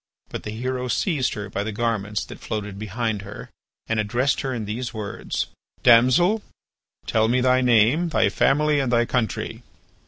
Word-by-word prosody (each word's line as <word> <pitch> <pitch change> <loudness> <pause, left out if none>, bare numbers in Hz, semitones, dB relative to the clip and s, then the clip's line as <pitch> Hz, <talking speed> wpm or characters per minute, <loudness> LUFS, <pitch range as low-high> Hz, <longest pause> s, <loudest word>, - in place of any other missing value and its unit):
But - - -5
the - - -7
hero 125 +3 -3
seized 140 0 0
her 105 -1 -5
by 100 +1 -3
the 110 - -3
garments 105 -2 -2
that - - -11
floated 105 -2 -5
behind 110 0 -2
her, 100 +1 -10 0.3
and 115 -1 -1
addressed 120 +6 +1
her 135 - -2
in 115 -4 -3
these 120 +4 -4
words: 105 -2 -3 0.4
"Damsel, 130 - +5 0.6
tell 110 0 +2
me 125 +3 +2
thy 130 0 +3
name, 125 +8 +3
thy - - +2
family 150 +1 +2
and 130 -3 0
thy 120 -1 +3
country." 120 -4 -2
120 Hz, 165 wpm, -23 LUFS, 105-130 Hz, 0.6 s, Damsel